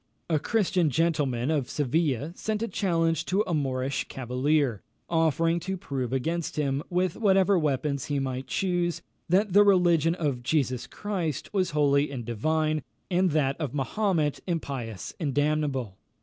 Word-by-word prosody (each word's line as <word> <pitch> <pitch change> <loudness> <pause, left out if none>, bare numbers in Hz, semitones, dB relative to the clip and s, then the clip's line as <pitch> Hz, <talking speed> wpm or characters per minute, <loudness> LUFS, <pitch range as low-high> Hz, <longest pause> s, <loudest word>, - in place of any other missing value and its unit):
A 155 - +3
Christian 185 -2 +1
gentleman 145 -3 +1
of 145 -5 0
Seville 145 0 0
sent 215 +3 -2
a - - -1
challenge 165 -6 +1
to 195 +3 +1
a 175 - -2
Moorish 135 -2 -1
cavalier, 130 -1 0 0.3
offering 165 +1 +2
to 190 +3 -4
prove 130 -8 -4
against 160 +6 -2
him, 140 -2 0
with 180 -1 0
whatever 195 -2 +4
weapons 140 -2 -1
he 145 - -1
might 130 -1 -3
choose, 175 0 -1 0.3
that 190 +2 +2
the 205 - +8
religion 175 -5 +4
of 145 -8 -1
Jesus 130 -2 0
Christ 185 -8 -4
was 185 -3 +1
holy 145 -2 +2
and 125 -4 -6
divine, 155 +7 0 0.3
and 180 +1 +3
that 145 -3 +1
of 145 -3 -3
Mahomet 155 +1 0
impious 130 - -4
and 145 -6 -2
damnable. 145 -8 0
155 Hz, 150 wpm, -27 LUFS, 135-175 Hz, 0.3 s, the